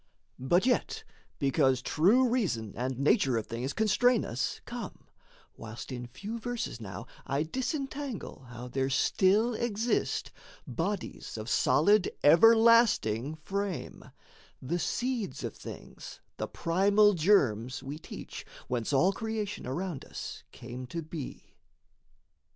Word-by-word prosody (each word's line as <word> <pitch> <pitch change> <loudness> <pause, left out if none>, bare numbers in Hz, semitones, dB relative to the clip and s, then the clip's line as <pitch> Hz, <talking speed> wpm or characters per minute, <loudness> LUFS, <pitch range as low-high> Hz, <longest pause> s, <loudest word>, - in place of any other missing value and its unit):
But 175 - +2
yet 250 -1 0 0.3
because 135 -2 +2
true 225 +11 +4
reason 175 - -1
and 125 +1 -2
nature 135 -2 +3
of 110 - -2
things 120 +4 -4
Constrain 220 - +3
us, 120 +2 -2
come, - - -7 0.5
whilst 110 +4 -8
in 125 -1 -5
few 205 - -6
verses 235 - -4
now 95 -5 -7 0.2
I 140 +2 0
disentangle 265 - -4
how 120 +1 -8
there 135 +1 -1
still 205 - +3
exist 230 +1 -1 0.3
Bodies 165 - -4
of 110 0 -6
solid, 180 +12 +4
everlasting 215 - +5
frame 195 +3 -4 0.5
The 165 +7 -2
seeds 240 - -2
of - - -4
things, - - -10 0.2
the - - -3
primal 200 +5 +3
germs 135 - +2
we 145 +3 -6
teach, - - -8 0.2
Whence 120 -1 -2
all 175 +8 +4
creation 220 - -4
around 165 +2 -3
us - - -7
came 125 +1 -8
to 165 +6 -5
be. 155 -3 -8
165 Hz, 120 wpm, -30 LUFS, 130-215 Hz, 0.5 s, everlasting